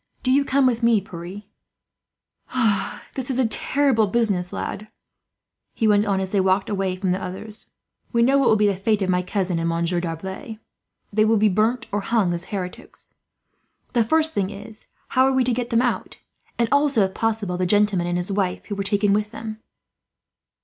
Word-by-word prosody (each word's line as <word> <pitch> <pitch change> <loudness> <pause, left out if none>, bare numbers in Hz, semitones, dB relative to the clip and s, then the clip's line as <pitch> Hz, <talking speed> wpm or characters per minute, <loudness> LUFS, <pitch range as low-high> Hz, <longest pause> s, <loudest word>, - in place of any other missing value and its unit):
"Do 255 - +2
you 280 +2 +4
come 275 0 +2
with 245 -2 +2
me, 230 -2 +4
Pierre. 190 +1 -9 1.7
"This 260 -1 -4
is 260 - 0
a 260 -3 +3
terrible 255 -1 +2
business, 195 -5 +1
lad," 210 +2 -5 0.9
he 225 - +1
went 210 0 +3
on, 195 -1 +1
as 190 -1 -3
they 200 - +2
walked 190 +2 +1
away 195 -2 -1
from 185 0 -1
the 185 +1 -1
others. 205 +4 -5 0.4
"We 235 0 +3
know 270 +3 +4
what 270 - +3
will - - +5
be 210 0 +3
the 200 - +3
fate 200 +2 0
of 185 - +1
my 180 0 +2
cousin 185 -2 -1
and 165 0 0
Monsieur 170 +1 0
D'Arblay. 190 +6 -6 0.6
They 215 +1 +4
will 220 +1 +3
be 215 +1 +4
burnt 225 +4 +1
or 205 0 -1
hung, 200 -5 +1
as 175 +1 -3
heretics. 185 -3 -7 0.8
The 235 -2 +3
first 315 +6 +2
thing 195 -2 0
is, 210 +2 -9 0.2
how 260 - +3
are 270 - +2
we 260 -1 +3
to 250 0 +1
get 240 0 -2
them 230 +1 +2
out; 245 - -2 0.4
and 235 - +2
also, 285 -6 +3
if 190 0 -1
possible, 220 -5 -1
the 185 0 0
gentleman 205 -3 +2
and 175 0 -1
his 180 +3 -3
wife 190 -2 -1
who 205 - -4
were 200 - -3
taken 205 0 +2
with 210 +1 0
them?" 220 -1 -7
210 Hz, 200 wpm, -23 LUFS, 190-230 Hz, 1.7 s, will